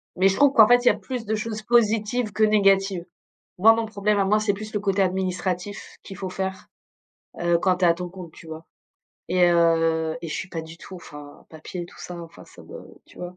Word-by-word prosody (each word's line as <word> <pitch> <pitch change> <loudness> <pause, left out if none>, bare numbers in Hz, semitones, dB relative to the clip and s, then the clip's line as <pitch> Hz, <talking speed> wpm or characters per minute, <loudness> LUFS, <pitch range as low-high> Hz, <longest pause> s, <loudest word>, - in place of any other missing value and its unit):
Mais 185 +2 +3
je 190 - +1
trouve 285 +3 +4
qu'en 220 -5 +7
fait, 245 +1 +4
il - - +3
y - - +8
a - - -3
plus 250 -3 -6
de 220 +1 -1
choses 215 0 -4
positives 225 0 +1
que 215 - 0
négatives. 195 -4 +2 0.5
Moi, 220 +5 +7
mon 225 0 -2
problème 210 -1 -1
à 200 - +2
moi, 210 +2 +2
c'est 210 -2 0
plus 215 +2 -8
le 210 - -2
côté 195 -1 +1
administratif 185 +1 -3
qu'il 195 - -10
faut 190 -1 -5
faire, 190 0 -5 0.7
heu, 175 0 +2
quand 185 +1 +1
tu 180 - 0
es - - +5
à 170 - +4
ton 180 +1 -6
compte, 175 -2 -11
tu 165 - -15
vois? 160 0 -9 0.6
Et 180 +1 +1
heu 165 -1 +2
et 165 - -6
je - - -4
suis 180 - -5
pas 165 -3 -5
du 160 +1 -11
tout, 185 - -11
enfin, 150 -4 -13
papier 160 +3 -8
et - - -8
tout - - -17
ça, 175 -1 -8
enfin, 170 0 -12
ça - - -16
me - - -11 0.2
tu - - -19
vois? 180 0 -8
190 Hz, 245 wpm, -23 LUFS, 170-210 Hz, 0.7 s, y